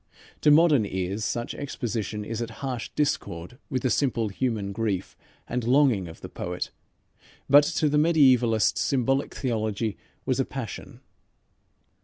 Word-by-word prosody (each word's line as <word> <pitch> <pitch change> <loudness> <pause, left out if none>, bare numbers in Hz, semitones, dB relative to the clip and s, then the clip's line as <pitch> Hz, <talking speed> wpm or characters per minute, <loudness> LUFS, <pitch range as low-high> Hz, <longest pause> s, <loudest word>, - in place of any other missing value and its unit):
To 150 - +5
modern 150 -5 +6
ears 95 +1 -3
such 120 +1 -2
exposition 110 -6 -4
is 115 +2 -4
at 115 - -3 0.2
harsh 125 -3 -3
discord 125 - -2
with 130 -2 -2
the 130 - +1
simple 115 -6 +1
human 105 -2 -2
grief 100 -3 -2 0.3
and 125 -1 -2
longing 125 -6 +3
of 80 - -12
the - - -6
poet, 90 0 -5 0.8
but 145 +1 +7
to 155 - +3
the 150 0 +2
mediaevalist 130 -8 +4
symbolic 135 +1 0
theology 110 -4 -2 0.3
was - - 0
a - - +2
passion. - - -7
120 Hz, 140 wpm, -26 LUFS, 105-135 Hz, 0.8 s, but